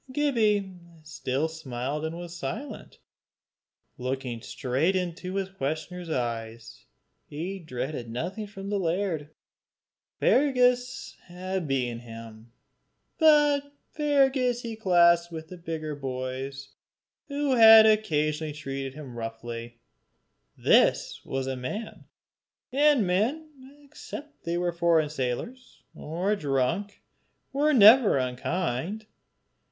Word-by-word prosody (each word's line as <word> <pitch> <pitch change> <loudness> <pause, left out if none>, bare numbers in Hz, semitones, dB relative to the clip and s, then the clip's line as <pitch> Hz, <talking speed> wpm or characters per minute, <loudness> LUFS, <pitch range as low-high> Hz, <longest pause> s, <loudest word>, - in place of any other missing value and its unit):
Gibbie 220 -9 +1 0.3
still 150 -1 -2
smiled 145 -2 -5
and 160 +1 -4
was 175 0 -8
silent, 175 - -6 1.0
looking 125 -2 -3
straight 135 +13 -1
in 180 -3 -1
his 190 +1 -4
questioner's 175 +1 -4
eyes. 115 -4 -4 0.4
He 175 +7 -5
dreaded 130 -5 -5
nothing 180 - -4
from 200 0 -8
the 205 - 0
laird. 170 -4 -1 0.9
Fergus 250 -2 +2
had 185 -1 -4
beaten 125 -4 -1
him, 115 -1 -11 0.7
but 295 -2 +4 0.2
Fergus 270 -5 +2
he 230 -1 -5
classed 170 -4 +4
with 160 -1 -8
the 185 - -8
bigger 160 -2 -5
boys 135 0 -5 0.6
who 285 -1 -1
had 225 -2 +9
occasionally 155 -8 +1
treated 135 -2 -5
him 140 -5 -9
roughly; 115 +1 -6 0.8
this - - +3
was 135 0 -3
a 135 0 -2
man, 165 - -6 0.7
and 285 -4 +4
men, 245 - 0 0.3
except 295 0 -10
they 170 +1 -1
were 175 0 0
foreign 165 -3 +2
sailors, 155 - -5
or 180 +7 -2
drunk, 160 +6 -1 0.5
were 295 +3 +2
never 225 - +7
unkind. 160 - -2
170 Hz, 105 wpm, -27 LUFS, 135-220 Hz, 1.0 s, had